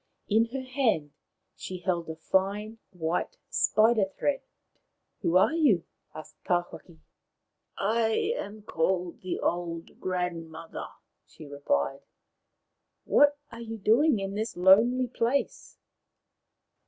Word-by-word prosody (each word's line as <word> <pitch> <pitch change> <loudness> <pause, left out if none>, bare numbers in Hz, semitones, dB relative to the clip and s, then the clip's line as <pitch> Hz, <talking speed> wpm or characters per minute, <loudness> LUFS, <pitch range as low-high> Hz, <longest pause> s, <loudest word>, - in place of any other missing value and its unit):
In 220 +2 +3
her 260 +3 -5
hand 250 - 0 0.4
she 185 - -6
held 175 -2 -2
a 160 - -4
fine 200 +6 -1
white 175 - -3
spider 220 -1 +3
thread. 285 - 0 0.8
Who 170 +2 +3
are 190 - +4
you? 270 - +3 0.2
" - - -40
asked 155 - -11
Tawhaki. 175 -2 -3 0.8
I 225 - +1
am 210 - -7
called 180 -1 -1
the 185 - -3
Old 170 -1 -3
Grandmother/' 165 -3 -4 0.3
she 155 - -13
replied. 140 - -1 1.0
What 290 0 +4
are 230 - -9
you 225 -1 -6
doing 230 +7 +4
in 195 0 -4
this 215 0 -3
lonely 220 +8 +5
place 245 +2 -2
195 Hz, 115 wpm, -28 LUFS, 170-230 Hz, 1.0 s, lonely